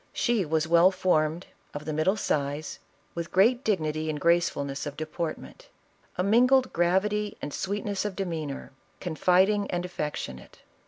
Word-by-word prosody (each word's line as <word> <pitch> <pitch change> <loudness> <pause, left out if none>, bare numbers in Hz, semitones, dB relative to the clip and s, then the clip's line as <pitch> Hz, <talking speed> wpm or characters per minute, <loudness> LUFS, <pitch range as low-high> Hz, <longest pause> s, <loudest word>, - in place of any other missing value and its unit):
She 235 -6 +1
was 160 +1 0
well 170 +2 +6
formed, 170 -2 0 0.3
of 145 - -6
the 155 - -3
middle 155 +6 +2
size, 145 -3 -2 0.3
with 170 -1 -5
great 235 +7 +4
dignity 155 -6 -1
and 150 -1 -2
gracefulness 145 -4 +1
of 145 0 -7
deportment; 155 +1 -6 0.5
a 180 - +1
mingled 250 +6 +4
gravity 200 +4 +1
and 145 - -6
sweetness 200 0 -2
of 205 -3 -3
demeanor; 160 -9 -4 0.3
confiding 190 +4 +2
and 175 0 -2
affectionate. 150 - -6
175 Hz, 140 wpm, -27 LUFS, 155-200 Hz, 0.5 s, well